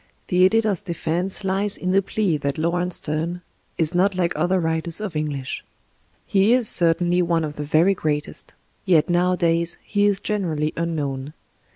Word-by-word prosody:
The 180 0 +3
editor's 215 -2 +1
defense 180 +1 -3
lies 195 +1 -1
in 185 - -2
the 195 +1 +4
plea 195 -3 -1
that 140 -1 -3
Laurence 175 +2 -1
Steme 165 +4 -3 0.3
is 160 +1 +1
not 185 +2 +2
like 175 -2 0
other 175 +4 +1
writers 160 +1 -2
of 210 -6 -5
English. 145 -3 -3 0.6
He 200 +4 +3
is 250 -3 +3
certainly 175 0 +4
one 170 -2 +1
of 150 -1 -4
the 150 - -4
very 160 +6 +3
greatest. 150 -5 -4 0.3
Yet 175 -4 +3
nowadays 175 -1 +1
he 205 0 +1
is 200 -2 +1
generally 165 -9 -2
unknown. 150 -4 -3
175 Hz, 160 wpm, -22 LUFS, 155-190 Hz, 0.6 s, the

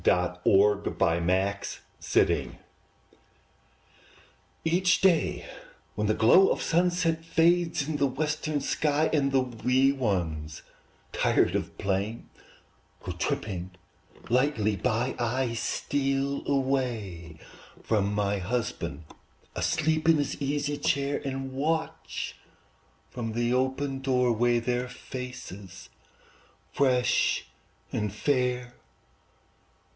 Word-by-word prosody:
ARE 90 0 +4
THE 100 +1 +4
CHILDREN 85 +1 +2
AT 100 +2 0 0.5
HOME? - - -2 2.1
Each 180 +3 +3
day, 185 -4 +2 0.5
when 105 0 -1
the 110 - +2
glow 180 +13 +6
of - - 0
sunset 170 -1 +1
Fades 165 -2 +2
in 155 -2 -2
the 140 - +2
western 150 +2 -2
sky, 150 +2 +1
And 140 -3 +2
the 135 -1 +3
wee 125 +2 +2
ones, 85 - -2 0.5
tired - - +2
of - - -3
playing, 100 +4 -2 0.8
Go - - -4
tripping 95 -3 -3 0.5
lightly 120 -4 +2
by, 125 +4 -1
I 120 +1 0
steal 135 +3 -1
away 120 - -1 0.5
from 100 -3 +1
my 100 -1 0
husband, 95 - -3 0.5
Asleep 160 +1 +1
in 165 - +7
his 145 -1 -2
easy 145 +1 -1
chair, 140 0 0
And 135 -1 -4
watch 160 +4 -2 0.8
from 115 -3 -4
the 120 +1 0
open 135 +1 -1
door 125 -2 +2
way 120 +1 +2
Their 125 +1 -1
faces 125 -7 -8 0.8
fresh 130 -3 +2 0.5
and 105 -2 -1
fair. 125 +1 0
125 Hz, 100 wpm, -28 LUFS, 105-145 Hz, 2.1 s, in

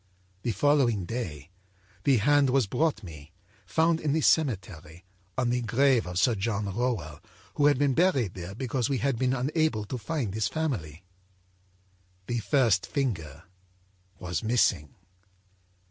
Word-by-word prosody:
âThe 115 -4 -1
following 120 -6 +2
day 85 - -6 0.5
the 140 -3 +4
hand 145 +4 +3
was 130 -2 +2
brought 145 +1 -1
me, 75 -3 -11 0.3
found 160 - +2
in 145 -2 0
the 160 - +1
cemetery, 95 - 0 0.3
on 125 -2 +1
the 125 0 0
grave 120 0 +2
of 90 0 -5
Sir 115 +6 +3
John 105 0 -2
Rowell, 110 -12 -2 0.3
who 145 - +3
had 145 -2 +3
been 140 -1 +2
buried 135 - +2
there 90 +1 -8
because 125 0 -2
we 135 - 0
had 135 -2 -1
been 130 0 +1
unable 135 -4 0
to 125 +5 -5
find 115 -3 -3
his 110 -1 0
family. 100 - -3 1.2
The 120 +2 -2
first 115 -6 +2
finger 110 - -3 0.7
was 90 -1 -3
missing. 110 - +1
120 Hz, 145 wpm, -27 LUFS, 95-140 Hz, 1.2 s, the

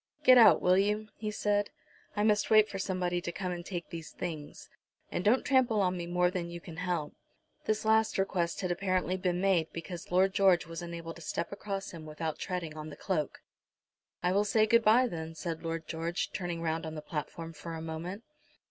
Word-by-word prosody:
"Get 255 -1 +8
out, 230 - +7
will 180 +1 +5
you?" 210 +2 0
he 215 0 -4
said. 205 -1 0 0.5
"I 205 - +1
must 210 -1 +3
wait 215 -1 +7
for 195 - -6
somebody 180 -2 -1
to 175 - -3
come 180 +1 -3
and 175 -1 -4
take 175 -2 -6
these 165 -2 -6
things. 155 -4 -6 0.4
And 175 - -2
don't 230 +7 +3
trample 255 -5 +3
on 185 -2 +2
me 170 -1 -4
more 180 0 +2
than 175 -2 -3
you 170 0 -6
can 165 -1 -10
help." 175 -4 -2 0.5
This 215 0 0
last 220 0 +3
request 180 -3 0
had 185 -2 -1
apparently 185 0 0
been 180 -1 -1
made, 185 -4 +2
because 170 +1 -7
Lord 190 +2 +4
George 190 -4 +4
was 165 +1 -6
unable 170 -1 -6
to 170 - -13
step 170 +1 -3
across 200 -1 -4
him 160 -3 -9
without 155 0 -4
treading 175 -4 -4
on 155 0 -6
the 145 - -9
cloak. 160 -7 -2 0.8
"I 180 - +3
will 200 +2 +3
say 215 +1 +3
good 230 +1 +4
bye, 230 +4 +6
then," 165 -7 -5
said 165 -1 -4
Lord 165 -1 -4
George, 165 +2 -2
turning 175 -2 -3
round 160 0 -1
on 160 - -6
the 155 - -6
platform 165 +2 -5
for 165 +1 -7
a - - -5
moment. 170 +6 -5
180 Hz, 210 wpm, -31 LUFS, 165-200 Hz, 0.8 s, Get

